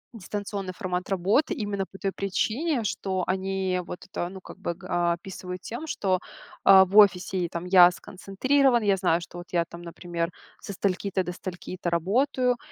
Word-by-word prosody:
дистанционный 200 -1 -5
формат 180 0 -3
работы 200 - +2
именно 200 -2 -2
по 195 - -11
той 195 0 -2
причине, 230 - -1
что 190 -3 -2
они 190 -1 -1
вот - - -8
это, 175 -2 -4
ну, 190 0 -10
как - - -12
бы, 170 - -3
а, 175 0 +2
описывают 180 +1 -8
тем, 240 +8 -5
что, 190 -10 0 0.4
а, 190 -1 +9
в 195 +3 -1
офисе: 195 -2 +5
"И 175 - 0
там 170 +1 -5
я 180 -1 +8
сконцентрирован, 240 +8 +1
я 200 -2 +3
знаю, 175 -2 +2
что 170 - -10
вот 175 - -11
я 170 -1 +2
там, 170 +1 -11
например, 170 0 -4 0.3
со 200 - -6
стольки-то 190 0 -1
до 180 - -4
стольки-то 180 0 -5
работаю, 245 - +1
190 Hz, 175 wpm, -26 LUFS, 180-205 Hz, 0.4 s, а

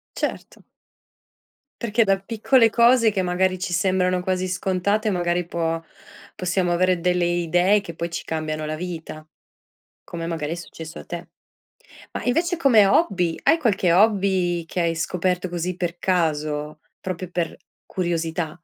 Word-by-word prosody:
Certo. - - -4 1.2
Perché 230 0 +2
da 195 -1 +2
piccole 225 +4 +3
cose 235 0 +5
che 195 -3 -1
magari 185 +1 +1
ci 180 -1 -4
sembrano 185 0 +1
quasi 185 0 -1
scontate, 190 +4 0
magari 175 -2 0
può 165 -1 -2 0.5
possiamo 180 0 0
avere 180 0 +2
delle 180 0 +1
idee 175 +4 +2
che 170 -5 -9
poi 170 0 -4
ci - - -4
cambiano 155 -1 -3
la 155 - -3
vita, 160 -2 -7 0.8
come 165 -1 -6
magari 160 -2 -3
è - - -1
successo 165 -1 -9
a - - -11
te. 175 0 -7 0.8
Ma - - -4
invece 335 +8 +1
come 250 -10 +5
hobby, 190 - +2
hai - - +5
qualche 195 - +2
hobby 190 -3 +2
che 180 - -4
hai 170 -1 +1
scoperto 180 +2 -1
così 175 +1 -3
per 175 -1 -3
caso, 155 -4 -1 0.2
proprio 185 -1 -5
per 175 -2 -3 0.3
curiosità? 165 -3 -2
180 Hz, 145 wpm, -23 LUFS, 170-195 Hz, 1.2 s, cose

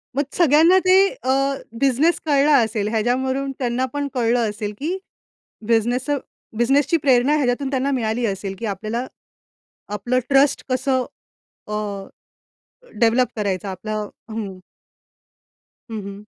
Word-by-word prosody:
मग 285 - +2
सगळ्यांना 330 +2 +5
ते 370 0 +6 0.3
अ, 260 - +1 0.5
बिझनेस 275 +5 +2
कळला 290 0 +4
असेल, 220 -4 0
ह्याच्यावरून 260 +5 0
त्यांना 250 0 0
पण 285 0 -2
कळलं 235 -2 +1
असेल, 210 0 -5
की 335 +6 -2 0.7
बिझनेस 240 +4 +1
अ, 290 - +2 0.4
बिझनेसची 275 +7 +3
प्रेरणा 265 +1 +4
ह्याच्यातून 270 -1 0
त्यांना 270 +1 0
मिळाली 235 -2 0
असेल 195 -2 -3
की 230 - -4
आपल्याला 215 +4 -3 0.9
आपलं 245 +4 0
ट्रस्ट 275 0 +3
कसं 260 0 +1 0.6
अ, 210 - -3 1.3
डेव्हलप 240 +2 +4
करायचं 200 -2 -2
आपलं 210 +3 -4 0.2
हं. 205 -4 -5 1.3
हं, 220 -2 -4
हं. 200 +1 -9
245 Hz, 120 wpm, -21 LUFS, 220-275 Hz, 1.3 s, ते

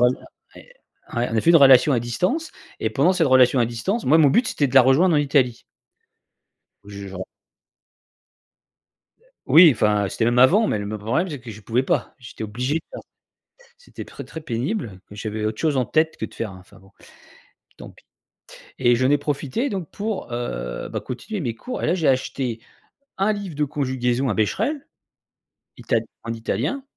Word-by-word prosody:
ouais, 125 +1 +5 1.0
on 120 -1 -1
a - - +3
fait 165 - +3
une 170 - +8
relation 135 -1 +6
à 120 - +2
distance 180 - -2 0.3
et - - -1
pendant 185 - +3
cette 175 -4 +1
relation 130 0 +5
à 120 - +3
distance, 120 - -3
moi, 155 +5 +5
mon 155 -3 +6
but, 240 - +2
c'était 145 - 0
de 125 - -8
la 135 - +8
rejoindre 155 +7 +4
en - - +4
Italie. 135 -5 +1 1.2
0ù - - -16
je 100 0 -8
j'en 95 -1 -7 2.2
Oui, 165 +1 +8
enfin, 105 -3 +1
c'était 110 - -2
même 120 +1 +2
avant, 195 - +5
mais, - - 0
le 100 - -5
me 105 +1 -5
problème, 125 - -1
c'est 145 - -5
que 120 -2 -10
je 105 - -12
pouvais 120 +5 -1
pas, - - -1
j'étais 125 -3 -10
obligé 125 +6 -3
de 165 - 0
faire. - - -8 0.8
C'était - - -11
très, - - -10
très 160 - -9
pénible. 120 - -4
Et, - - -10
j'avais 105 0 -5
autre 110 - -3
chose 155 -3 +1
en 130 - +2
tête 160 +3 +1
que - - -8
de - - -16
faire 115 -4 -5
un 95 - -12
enfin 90 - -19
bon, 95 0 -21 0.9
tant - - -11
pis. - - -23 0.8
Et 120 -2 +4
j'en 130 +3 +1
ai 145 - +4
profité, 145 - -2
donc, 185 -6 -5
pour, 205 - -5
heu, 60 - -4
bah, - - -4
continuer 200 - -6
mes 120 -8 -3
cours. 250 - -6
Et - - 0
là, 165 - +2
j'ai 165 -5 -1
acheté 130 -3 -1 0.6
un 195 +3 +1
livre 200 -6 -6
de 150 - 0
conjugaison 130 -2 -1
un 105 - 0
Bescherelle, 220 - -1 0.9
Ital 115 - 0 0.2
en 115 - -4
italien. 190 - -3
130 Hz, 190 wpm, -22 LUFS, 115-165 Hz, 2.2 s, une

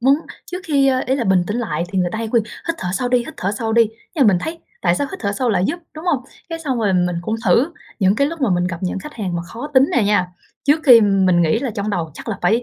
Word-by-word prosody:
muốn 270 +3 +5 0.4
trước 360 - -3
khi 280 -3 +3
ơ, 260 -1 +2
ý 260 - +2
là 240 - -1
bình 185 -2 +3
tĩnh 210 - -2
lại 170 -8 -2
thì 190 - 0
người 180 -1 +2
ta 220 - -3
hay 225 -1 -3
khuyên 230 -1 +2 0.3
"hít 335 - +1
thở 180 - -3
sâu 245 +6 -1
đi, 250 0 +3
hít 235 - -6
thở 190 - -1
sâu 225 -1 -1
đi", 230 -1 +4 0.3
nhưng 275 -6 +4
mình 195 -4 +5
thấy 330 +1 -5 0.2
tại 175 -2 +3
sao 285 - -1
hít 380 - -6
thở 200 -3 -1
sâu 245 +4 -1
lại 185 -3 +1
giúp, - - -1 0.2
đúng 310 +3 -8
hông? 285 -8 0 0.2
Cái 330 0 -4
xong 270 -7 -2
rồi 205 -4 +1
mình 180 -1 +1
cũng 220 +4 -2
thử, 245 - +3 0.3
những 195 +1 +3
cái 280 - +3
lúc 330 +1 -5
mà 255 - +2
mình 175 0 +1
gặp 170 -2 -4
những 185 +1 -2
khách 300 +9 -9
hàng 185 -6 -3
mà 170 - -3
khó 230 +10 -7
tính 260 +1 +7
nè 235 - +4
nha, 205 -3 +2 0.4
trước 295 +3 +3
khi 245 -4 +9
mình 190 -4 +3
nghĩ 160 +7 +2
là 260 -2 -2
trong 210 -1 -3
đầu 170 -5 -2
chắc - - -9
là 200 - -3
phải 230 +3 +3
225 Hz, 305 wpm, -19 LUFS, 185-265 Hz, 0.4 s, khi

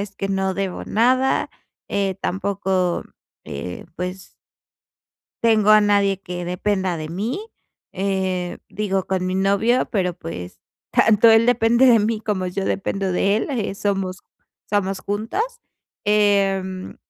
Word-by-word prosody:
es 200 -1 -6
que 195 - -3
no 190 -1 0
debo 195 -1 -3
nada, 255 +4 +2 0.4
eh, 195 -2 -1
tampoco, 190 -2 -1 0.4
eh, 80 +6 -6
pues 180 +2 -7 1.0
tengo 220 -2 +4
a 215 0 +8
nadie 200 -2 +2
que 180 -2 -6
dependa 185 0 -1
de 155 0 -5
mí, 210 - -3 0.5
eh, 190 -2 -2
digo, 195 -2 -2
con 185 -1 -1
mi 185 - -1
novio, 200 +6 +2
pero, 185 -5 0
pues, 90 - -8 0.3
tanto 220 +1 +5
él 225 +1 +5
depende 240 +1 +4
de 235 -2 +7
mí 215 +1 0
como 205 -4 -2
yo 190 +2 -3
dependo 195 0 -1
de 195 +3 +2
él, - - -2
eh, 220 -7 -2
somos 195 -2 -2 0.5
somos 195 -2 0
juntos, 215 - -2 0.6
em, 195 -3 +1
195 Hz, 135 wpm, -21 LUFS, 185-210 Hz, 1.0 s, a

